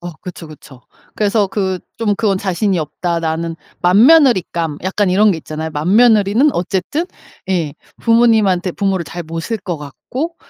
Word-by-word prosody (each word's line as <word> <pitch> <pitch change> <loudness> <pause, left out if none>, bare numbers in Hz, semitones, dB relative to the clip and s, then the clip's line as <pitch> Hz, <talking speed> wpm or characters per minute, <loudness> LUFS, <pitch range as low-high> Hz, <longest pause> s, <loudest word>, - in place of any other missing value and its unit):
어 175 -1 -7
그쵸, 180 -2 -9
그쵸. 145 -4 -14 0.3
그래서 210 0 +1
그 190 -1 -2 0.2
'좀 220 -3 0
그건 200 -3 +1
자신이 190 0 -1
없다, 170 +2 -2
나는.' 165 0 -3 0.2
맏며느리감 190 - +4
약간 190 +2 0
이런 205 +3 +4
게 170 - -1
있잖아요. 155 +1 -6
맏며느리는 210 - +3
어쨌든 190 - -2 0.4
예 165 -6 -1 0.3
부모님한테 220 -6 +3
부모를 195 -4 -1
잘 175 +4 -7
모실 165 +8 -4
것 180 -4 -5
같고 255 - -6
190 Hz, 320 characters per minute, -17 LUFS, 165-215 Hz, 0.4 s, 맏며느리감